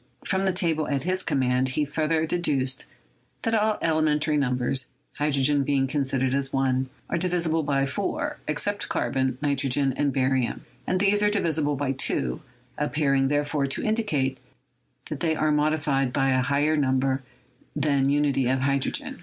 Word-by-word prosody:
From 190 Hz, 0 st, 0 dB
the 190 Hz, -, +3 dB
table 165 Hz, -4 st, 0 dB
at 140 Hz, -2 st, -1 dB
his 185 Hz, +2 st, 0 dB
command 130 Hz, -4 st, +1 dB
he 150 Hz, +4 st, 0 dB
further 155 Hz, +2 st, 0 dB
deduced 140 Hz, -6 st, 0 dB, 0.6 s
that 225 Hz, -, 0 dB
all 215 Hz, -1 st, +2 dB
elementary 155 Hz, -1 st, +1 dB
numbers, 130 Hz, -1 st, 0 dB, 0.3 s
hydrogen 145 Hz, -1 st, +2 dB
being 135 Hz, -1 st, +1 dB
considered 135 Hz, -2 st, 0 dB
as 135 Hz, 0 st, 0 dB
1, 130 Hz, -1 st, 0 dB, 0.2 s
are 170 Hz, -, -1 dB
divisible 170 Hz, -2 st, +1 dB
by 140 Hz, -2 st, +1 dB
4, 135 Hz, -, -3 dB
except -, -, -2 dB
carbon, 130 Hz, -1 st, -1 dB
nitrogen 140 Hz, -1 st, +1 dB
and 145 Hz, -1 st, +1 dB
barium, 130 Hz, -2 st, 0 dB, 0.2 s
and 185 Hz, -, +1 dB
these 205 Hz, +1 st, +3 dB
are 210 Hz, -, +4 dB
divisible 160 Hz, -8 st, +1 dB
by 135 Hz, -1 st, -1 dB
2, 135 Hz, +3 st, -1 dB, 0.4 s
appear 150 Hz, -1 st, +1 dB
ing, 135 Hz, 0 st, +3 dB
therefore, 145 Hz, 0 st, 0 dB
to 135 Hz, -, -1 dB
indicate 155 Hz, -, 0 dB, 0.7 s
that -, -, -4 dB
they 160 Hz, -2 st, +1 dB
are 155 Hz, 0 st, +1 dB
modified 150 Hz, -3 st, +1 dB
by 135 Hz, 0 st, +1 dB
a 130 Hz, 0 st, +2 dB
higher 140 Hz, +4 st, +1 dB
number 135 Hz, -1 st, +1 dB, 0.5 s
than 140 Hz, -2 st, +2 dB
unity 140 Hz, -3 st, +2 dB
or 130 Hz, -, +3 dB
hydrogen. 140 Hz, +1 st, -1 dB
145 Hz, 155 wpm, -25 LUFS, 135-155 Hz, 0.7 s, are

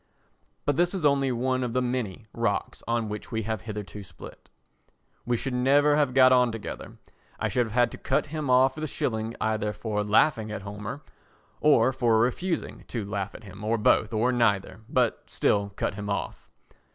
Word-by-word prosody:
But 145 Hz, -1 st, +1 dB
this 175 Hz, +2 st, +2 dB
is 175 Hz, -5 st, -2 dB
only 140 Hz, -2 st, +3 dB
one 130 Hz, +1 st, 0 dB
of 120 Hz, -2 st, -3 dB
the 125 Hz, -, +1 dB
many 120 Hz, -5 st, -3 dB
rocks -, -, -2 dB
on 115 Hz, -1 st, 0 dB
which 105 Hz, +3 st, -6 dB
we 110 Hz, -1 st, -1 dB
have 110 Hz, -1 st, -3 dB
hitherto 105 Hz, -3 st, -7 dB
split. 90 Hz, -3 st, -13 dB, 0.8 s
We 120 Hz, -1 st, +1 dB
should 135 Hz, +2 st, -3 dB
never 140 Hz, +4 st, +4 dB
have 145 Hz, -4 st, +1 dB
got 130 Hz, -1 st, +7 dB
on 125 Hz, -2 st, +4 dB
together; 115 Hz, -2 st, -7 dB, 0.4 s
I -, -, 0 dB
should 120 Hz, -2 st, +1 dB
have 110 Hz, -, -9 dB
had 120 Hz, -1 st, +3 dB
to -, -, -9 dB
cut -, -, 0 dB
him 150 Hz, -2 st, -4 dB
off 130 Hz, +1 st, +5 dB
with 155 Hz, -, -7 dB
a -, -, -1 dB
shilling 110 Hz, -4 st, -2 dB
either 110 Hz, -1 st, -1 dB
for 105 Hz, -2 st, -2 dB
laughing 110 Hz, +1 st, +2 dB
at 105 Hz, -2 st, -5 dB
Homer, 105 Hz, +7 st, -6 dB, 0.6 s
or 150 Hz, -3 st, +4 dB
for 120 Hz, -3 st, +2 dB
refusing 165 Hz, +10 st, -1 dB
to 115 Hz, -4 st, -4 dB
laugh 100 Hz, -1 st, -4 dB
at -, -, -11 dB
him, 100 Hz, 0 st, -11 dB
or 110 Hz, +2 st, +1 dB
both, 105 Hz, 0 st, +3 dB
or 115 Hz, +3 st, +2 dB
neither, 105 Hz, -5 st, +1 dB
but 125 Hz, -4 st, 0 dB
still 100 Hz, 0 st, +1 dB
cut -, -, -1 dB
him 105 Hz, 0 st, -6 dB
off. 100 Hz, -, -4 dB
115 Hz, 190 wpm, -27 LUFS, 105-130 Hz, 0.8 s, got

